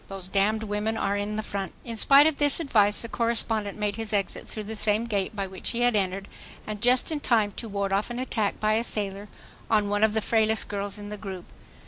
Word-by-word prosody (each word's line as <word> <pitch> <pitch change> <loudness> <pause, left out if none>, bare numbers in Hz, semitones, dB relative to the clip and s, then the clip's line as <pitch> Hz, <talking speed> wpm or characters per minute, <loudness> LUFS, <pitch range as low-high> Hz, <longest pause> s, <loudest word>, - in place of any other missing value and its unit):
Those 195 -2 -7
damned 210 +3 +1
women 210 +1 -2
are 200 - 0
in 205 +1 -2
the 215 - -2
front." 195 -4 -4
In 230 -2 -5
spite 275 +6 +6
of 315 -2 +2
this 290 +1 +3
advice 210 -10 +3
the - - -4
correspondent 225 -3 -1
made 210 0 -1
his 225 -1 -4
exit 200 -3 -2
through 215 - -4
the 220 +2 -6
same 215 +1 +1
gate 205 -2 -2
by 200 -1 -2
which 190 -1 -4
he 235 - -1
had 245 -2 +3
entered, 195 0 -1 0.4
and 210 -1 -5
just 250 +5 +3
in 305 - -1
time 220 -7 +2
to 230 - -3
ward 200 -1 -1
off 200 +4 0
an 240 - -5
attack 225 -5 -1
by 215 0 +2
a 225 +2 +1
sailor 205 -2 -3 0.4
on 210 -2 +2
one 205 +1 +1
of 220 0 +3
the - - +3
frailest 220 -1 +2
girls 200 0 -4
in 205 0 -8
the 210 - -5
group. 190 -3 -7
210 Hz, 240 wpm, -26 LUFS, 200-225 Hz, 0.4 s, spite